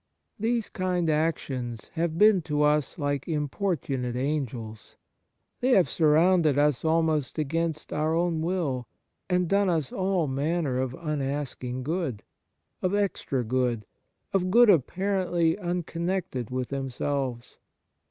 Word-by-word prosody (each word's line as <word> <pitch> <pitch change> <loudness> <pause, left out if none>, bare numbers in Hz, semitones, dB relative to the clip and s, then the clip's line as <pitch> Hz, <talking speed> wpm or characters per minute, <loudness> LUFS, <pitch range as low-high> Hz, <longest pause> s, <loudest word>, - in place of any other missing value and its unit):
These 230 +1 0
kind 180 -3 0
actions 135 -7 -2
have 165 -1 -2
been 210 -1 +6
to 150 0 +2
us 150 -1 +2
like 145 -3 -1
impor 165 +4 -1
tunate 125 -3 -3
x\ngels. 125 -6 -3 0.6
They 255 +1 +3
have 185 - +5
surrounded 160 -1 +4
us 145 -3 +2
almost 160 -3 +1
against 160 +1 -2
our 155 +2 +1
own 170 -1 +1
will, 160 -8 -1 0.4
and 180 -1 +2
done 200 +1 +2
us 160 -6 0
all 185 -3 0
manner 140 0 -1
of 130 -1 -2
unasked 140 -4 -3
good, 155 - -2 0.6
of 185 +2 +1
extra 190 -10 -1
good, 120 -2 0 0.5
of 185 -2 +1
good 235 +2 +7
apparently 175 0 +1
unconnected 175 - -2
with 125 -1 -3
them 135 -1 -3
selves. 130 -2 -3
155 Hz, 125 wpm, -27 LUFS, 135-180 Hz, 0.6 s, good